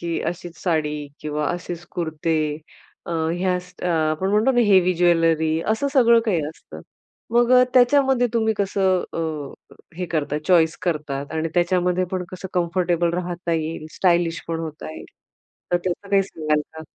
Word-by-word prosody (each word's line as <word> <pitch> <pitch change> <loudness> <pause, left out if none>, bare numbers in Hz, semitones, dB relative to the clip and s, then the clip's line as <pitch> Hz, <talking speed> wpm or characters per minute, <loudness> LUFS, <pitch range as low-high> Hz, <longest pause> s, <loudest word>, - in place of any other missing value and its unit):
की 170 -1 -2
अशीच 175 0 -5
साडी 150 -4 -1
किंवा 150 -1 -2
असेच 175 -1 -5
कुर्ते 160 -1 -2 0.7
अ, - - -5 0.3
ह्या 180 0 0
स 180 0 -17
अ, - - -1
आपण 160 +3 0
म्हणतो 215 +5 +3
ना, 245 -2 +3
हेवी 185 -2 +5
ज्वेलरी, 165 -2 +2
असं 220 +6 +1
सगळं 235 -4 +5
काही 180 -8 +1
असतं. 160 - -12 0.5
मग 240 0 +3 0.2
त्याच्यामध्ये 260 0 +4
तुम्ही 220 -1 +2
कसं 190 -2 +1 0.2
अ, 155 -4 -6 0.2
हे 180 -1 -3
करतात 150 -2 -2
चॉईस 165 -3 +4
करतात 150 -4 -3
आणि 160 +1 -1
त्याच्यामध्ये 180 +1 +2
पण 185 -1 -2
कसं 185 +1 -7
कम्फर्टेबल 175 -1 +1
राहता 175 -1 -3
येईल. 160 -1 -3
स्टाइलिश 170 -2 +2
पण 165 -1 -2
होता 155 -1 -6
येईल. - - -9 0.7
तर - - +5
त्याचं 180 +3 -4
काही 195 -1 +4
सांगाल 155 -5 -1
का? 160 0 -8
175 Hz, 155 wpm, -22 LUFS, 160-185 Hz, 0.7 s, हेवी